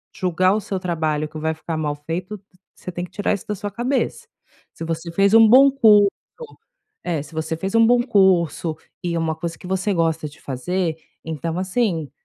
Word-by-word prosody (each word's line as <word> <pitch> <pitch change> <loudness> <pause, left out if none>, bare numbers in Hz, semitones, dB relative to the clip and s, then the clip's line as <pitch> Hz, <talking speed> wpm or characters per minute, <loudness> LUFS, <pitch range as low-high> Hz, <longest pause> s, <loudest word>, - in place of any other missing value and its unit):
julgar 185 +1 +2
o 215 - 0
seu 195 -1 -4
trabalho 160 -4 -1
que 155 0 -9
vai 160 +1 -1
ficar 160 +1 -5
mal 150 -2 -2
feito, 175 +7 -5 0.4
você 180 - -8
tem 175 0 -5
que 180 - -7
tirar 205 +2 -1
isso 200 - -6
da 210 - -2
sua 205 +1 -5
cabeça. 260 - -2 0.4
Se - - -9
você 165 +1 -4
fez 195 +4 +2
um 225 0 +8
bom 270 +3 +7
curso 215 -6 +6 1.0
é, 160 -4 -1
se 150 - -15
você 160 +1 -2
fez 195 +5 -3
um 230 0 +6
bom 245 0 +4
curso 185 - +2 0.3
e 170 -1 -1
uma 160 -1 -1
coisa 165 +1 -5
que 180 - -11
você 190 +2 0
gosta 165 -3 0
de 145 - -18
fazer, 160 +6 -2 0.3
então, 160 +1 -4
assim, 185 - -1
180 Hz, 195 wpm, -21 LUFS, 160-205 Hz, 1.0 s, um